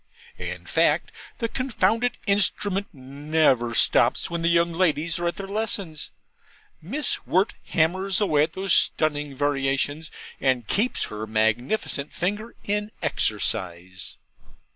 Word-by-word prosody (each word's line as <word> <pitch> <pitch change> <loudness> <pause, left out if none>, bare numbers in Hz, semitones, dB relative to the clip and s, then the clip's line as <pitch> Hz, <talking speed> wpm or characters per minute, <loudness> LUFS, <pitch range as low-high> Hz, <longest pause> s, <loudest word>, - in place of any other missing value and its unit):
In - - -6
fact, - - +1 0.3
the 230 - -1
confounded 235 -1 0
instrument 200 0 +2
never 135 -3 0
stops - - +3
when 170 -1 -2
the 165 - +1
young 170 0 +3
ladies 165 -1 +1
are 175 - -1
at 170 - -1
their 195 - -6
lessons, 200 -6 -3 0.7
Miss 270 - -1
Wirt 190 +5 +2
hammers 185 +5 +1
away 155 -9 +2
at 160 +2 0
those 190 -1 +1
stunning 145 -2 +2
variations, 145 +2 -1 0.3
and 130 -3 +1
keeps 220 - +1
her 105 +1 -5
magnificent 120 - 0
finger 210 +6 -3
in 210 +1 -1
exercise. 95 - -2
165 Hz, 120 wpm, -24 LUFS, 140-200 Hz, 0.7 s, stops